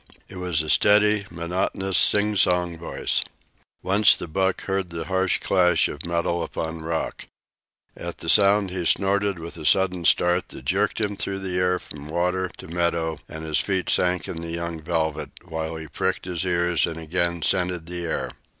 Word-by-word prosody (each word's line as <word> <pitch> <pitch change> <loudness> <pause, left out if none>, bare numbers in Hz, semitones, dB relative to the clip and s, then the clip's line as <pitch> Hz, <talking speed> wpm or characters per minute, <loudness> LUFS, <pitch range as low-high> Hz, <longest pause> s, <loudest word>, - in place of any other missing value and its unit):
It 95 - -11
was 90 -4 0
a 80 - -6
steady, 105 0 +4
monotonous, 90 +3 -2
singsong 90 -5 +3
voice. 85 - -1 0.6
Once 100 +2 +5
the - - -6
buck 95 +3 -1
heard 95 -2 -2
the 85 -1 -5
harsh 95 0 +1
clash 90 -4 +3
of 75 +3 -7
metal 85 0 -1
upon 80 0 -4
rock. 80 0 -4 0.7
At - - -6
the - - -8
sound 100 -1 +5
he 90 -1 -3
snorted 100 +2 +2
with 85 0 -8
a - - -8
sudden 90 -1 +2
start 90 +2 +3
that - - -11
jerked - - 0
him 105 -2 -1
through 95 0 -3
the 90 -1 -2
air 90 0 +2
from 75 -4 -10
water 90 +3 0
to - - -10
meadow, 85 -1 -1
and 80 0 -7
his 80 -1 +1
feet 95 -2 0
sank 90 0 +1
into 80 - -5
the 85 - -6
young 85 -1 -4
velvet, 80 -1 -2
while 80 -2 -5
he 80 -1 -7
pricked - - -2
his 90 -1 -3
ears 85 -2 +1
and 80 -1 -6
again 85 0 -1
scented 90 -3 0
the 90 +1 -6
air. 80 - -3
90 Hz, 175 wpm, -24 LUFS, 85-95 Hz, 0.7 s, Once